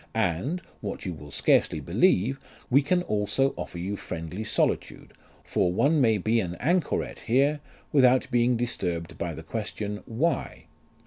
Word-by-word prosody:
And 115 - 0 0.2
(what 100 -2 -5
you 90 - -2
will 75 -2 -11
scarcely - - +2
believe) 130 +9 +2 0.3
we 135 +3 +6
can 180 +5 +1
also 105 - +1
offer - - -6
you 95 +4 -3
friendly 85 +2 -5
solitude, 110 - -1 0.3
for 90 - +1
one 145 - +3
may 110 -4 +4
be 110 +4 +1
an 90 -4 -3
anchoret 170 +2 0
here 140 +5 +3 0.3
without 130 -2 +4
being 120 0 +3
disturbed 90 -9 -3
by - - -3
the - - -8
question, 105 0 -4
Why 130 +9 -1
115 Hz, 145 wpm, -27 LUFS, 95-135 Hz, 0.3 s, we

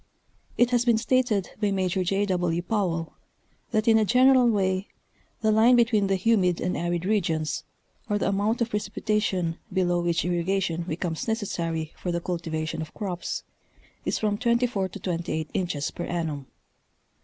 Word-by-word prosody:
It 245 0 +4
has 245 -1 +3
been 235 -2 +3
stated 235 -4 +1
by 205 - +2
Major 190 -1 0
J. 195 +3 +1
W. 175 -3 0
Powell, 175 -5 -1 0.6
that 220 -1 0
in 225 -1 +6
a - - +3
general 250 +2 +5
way 190 -2 +1 0.5
the 220 -1 +3
line 225 +3 +6
between 225 -4 +3
the 195 - +2
humid 185 -3 +2
and 180 +1 -1
arid 175 0 -1
regions, 165 -7 0 0.5
or 205 - +2
the - - 0
amount 205 +4 0
of 235 - -5
precipitation 205 -4 -1
below 175 -2 +1
which 170 -1 0
irrigation 175 0 0
becomes 165 +1 -3
necessary 170 -8 -2
for 180 - -4
the 170 - 0
cultivation 165 -2 -3
of 160 - -8
crops, 185 -5 -4 0.6
is - - 0
from 210 -1 0
24 235 -5 +1
to - - -9
28 165 -3 -2
inches 170 -7 -1
per 175 - -5
annum. 155 -6 -3
190 Hz, 155 wpm, -26 LUFS, 170-215 Hz, 0.6 s, in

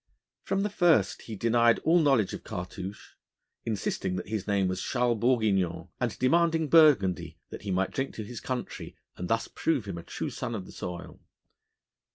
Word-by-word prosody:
From 195 0 -1
the 210 - -1
first 165 - +3
he 110 - -7
denied 115 +2 +3
all 170 +2 +5
knowledge 135 - +3
of - - -7
Cartouche, 95 0 -7 0.6
insisting 95 -3 -2
that 95 - -5
his 110 -2 -3
name 100 -2 +2
was 95 0 -2
Charles 120 -2 0
Bourguignon, 110 -7 +1
and - - -1
demanding 165 +3 +2
burgundy, 135 - +4
that - - -7
he 105 - -6
might 95 0 0
drink 135 0 -3
to 110 - -5
his 120 +2 -7
country 130 -1 -5 0.2
and 90 - -5
thus 115 +3 0
prove 145 -9 -1
him 90 -4 -5
a - - -9
true - - -5
son 120 -1 -4
of 95 -4 -5
the - - -12
soil. 90 -1 -7
110 Hz, 180 wpm, -28 LUFS, 95-135 Hz, 0.6 s, all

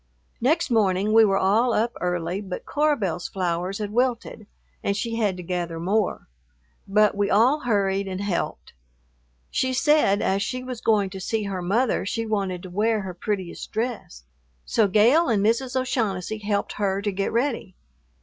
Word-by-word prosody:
Next 310 +4 +1
morning 205 -2 +2
we 225 0 +7
were 195 -2 +3
all 220 +6 +2
up 230 +2 0
early, 180 +1 -1
but 190 -3 -6
Cora 300 0 +1
Belle's 180 -4 -2
flowers 180 0 -2
had 210 -1 -4
wilted 235 -3 -1 0.4
and 200 0 0
she 230 +2 -2
had 205 -5 0
to 180 - -7
gather 175 -2 -3
more, 195 +4 -1 0.6
but 210 +1 +4
we 200 0 0
all 250 +8 +4
hurried 200 -6 0
and 185 -1 -4
helped. 200 -4 -3 0.8
She 260 0 0
said 265 -8 +3
as 195 +1 +1
she 255 +5 -3
was 255 -2 -6
going 205 -4 +2
to 190 - -7
see 220 +3 -1
her 195 -2 -3
mother 220 +7 +1
she 225 +3 -2
wanted 195 -5 -2
to 185 - -9
wear 215 +3 +1
her 190 -2 -6
prettiest 185 -1 -4
dress, 220 - -4 0.4
so 220 -3 +2
Gale 235 - +4
and 205 -3 +2
Mrs. 250 +4 +1
O'Shaughnessy 220 -5 -2
helped 205 -1 -2
her 195 -1 +1
to 205 0 -1
get 195 +1 -2
ready. 235 -6 -1
205 Hz, 170 wpm, -24 LUFS, 190-230 Hz, 0.8 s, we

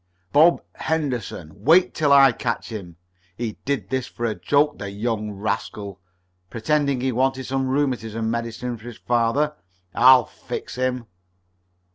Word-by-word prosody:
"Bob 165 +4 +5
Henderson. 120 - -3
Wait 175 +7 +5
till 150 -3 +1
I 135 -1 +8
catch 115 0 -3
him! 95 -7 -7 0.4
He 115 -3 -4
did 140 -1 -2
this 130 -1 -1
for 120 - -5
a 110 - 0
joke. 145 +6 +1
The 100 - -5
young 105 +1 -2
rascal! 100 -1 -4 0.5
pretending 140 +3 0
he 130 0 0
wanted 130 +2 0
some 135 0 -1
rheumatism 115 -5 -1
medicine 115 +1 -4
for 110 - -16
his 120 -2 -8
father! 120 +6 +1 0.4
I'll 130 +1 +7
fix - - -7
him!" 125 -1 -2
125 Hz, 140 wpm, -23 LUFS, 110-135 Hz, 0.5 s, I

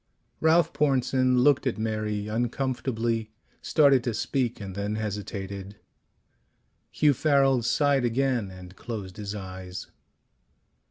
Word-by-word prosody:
Ralph 165 +2 +3
Pornsen 130 -2 +2
looked 140 -1 +4
at 125 - -1
Mary 110 -1 -2
uncomfortably, 120 -1 -1 0.3
started 140 -5 +4
to 120 -3 -1
speak 125 +1 -1
and 100 -2 -6
then 100 +2 -3
hesitated. 100 -2 -5 1.1
Hugh 150 -1 +3
Farrel 135 -2 +3
sighed 140 +3 +2
again 120 -3 0
and 95 0 -12
closed 100 -5 -7
his 105 -1 -5
eyes. 95 -2 -8
115 Hz, 110 wpm, -26 LUFS, 105-135 Hz, 1.1 s, looked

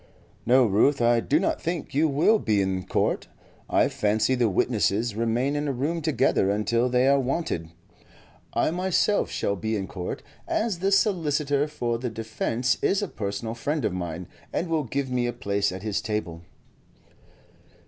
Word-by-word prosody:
"No, 130 +1 +6
Ruth, 115 +7 +3
I 120 0 +4
do 145 +6 +1
not 190 - -1
think 165 -4 -3
you 150 +4 +3
will 155 +10 +3
be 105 -3 +1
in 95 -1 -1
court. - - 0 0.4
I - - +3
fancy 110 +4 +1
the 120 -3 +2
witnesses 110 +2 +1
remain 115 +6 0
in 145 0 -1
a - - +1
room 150 +6 -2
together 140 -9 +2
until 115 +4 +1
they 125 +1 +3
are 140 0 +5
wanted. 130 - -2 0.8
I - - +1
myself 185 +3 +1
shall 100 - -1
be 110 +3 -2
in 100 -2 -2
court, 90 -2 -6 0.2
as 215 -6 -1
the 195 +2 +1
solicitor 150 -8 +2
for 120 -6 -2
the 125 0 -3
defence 115 +3 -1
is 200 +1 +2
a - - -1
personal 110 - -4
friend 145 +3 -2
of 100 - 0
mine, 85 -1 -5 0.2
and 170 - -2
will 160 -3 0
give 135 +2 -3
me 125 -1 +1
a 120 - -2
place 100 -4 -1
at 95 +1 -7
his 105 -2 -1
table." 105 -6 -3
120 Hz, 170 wpm, -25 LUFS, 105-150 Hz, 0.8 s, No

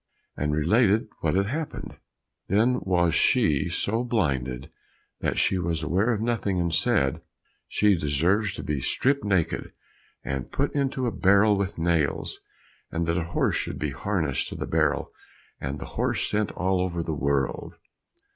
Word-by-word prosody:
and 75 0 -1
related 105 +8 +3
what 80 +1 0
had 100 +1 +2
happened. 150 +8 -5 0.5
Then 115 +6 +3
was 85 -3 +2
she 75 +1 +3
so 110 +6 -1
blinded 70 - -1 0.5
that - - -1
she 95 - +2
was 85 -2 -1
aware 95 +9 +1
of 110 -3 -1
nothing 110 -5 0
and 85 -1 0
said, 65 0 +2 0.5
"She 105 -1 +3
deserves 85 +6 +1
to - - -6
be 75 -2 -1
stripped 135 - +1
naked, 95 -5 0 0.5
and 65 -1 -4
put - - -1
into 135 -2 0
a 120 - 0
barrel 100 +2 +4
with 100 0 -2
nails, 80 -3 0 0.5
and 85 +1 -1
that 85 0 0
a 80 - -3
horse - - +2
should - - -3
be 75 -2 -2
harnessed 80 -5 -1
to - - -7
the - - -4
barrel, - - 0 0.5
and 70 +1 -4
the - - -7
horse - - 0
sent 105 0 0
all 95 0 0
over 85 -2 -2
the 80 - -3
world." 70 -2 -1
90 Hz, 160 wpm, -26 LUFS, 75-105 Hz, 0.5 s, barrel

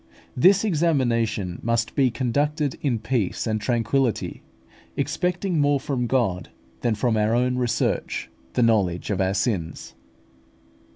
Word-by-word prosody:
This 190 - +5
examination 120 - 0
must 115 0 0
be 135 -3 +3
conducted 140 +4 -1
in 130 -5 +1
peace 115 -4 -1
and 110 -2 -1
tranquillity, 120 +1 0 0.6
expecting 180 -2 0
more 145 -1 +3
from 130 -3 -2
God 115 -9 0 0.3
than 115 -2 0
from 115 +2 +1
our 110 +1 +2
own 125 +1 +1
research 125 -2 -1 0.3
the 125 - +2
knowledge 100 -6 +1
of 95 - 0
our 95 +1 +1
sins. 95 - -2
120 Hz, 125 wpm, -24 LUFS, 110-140 Hz, 0.6 s, This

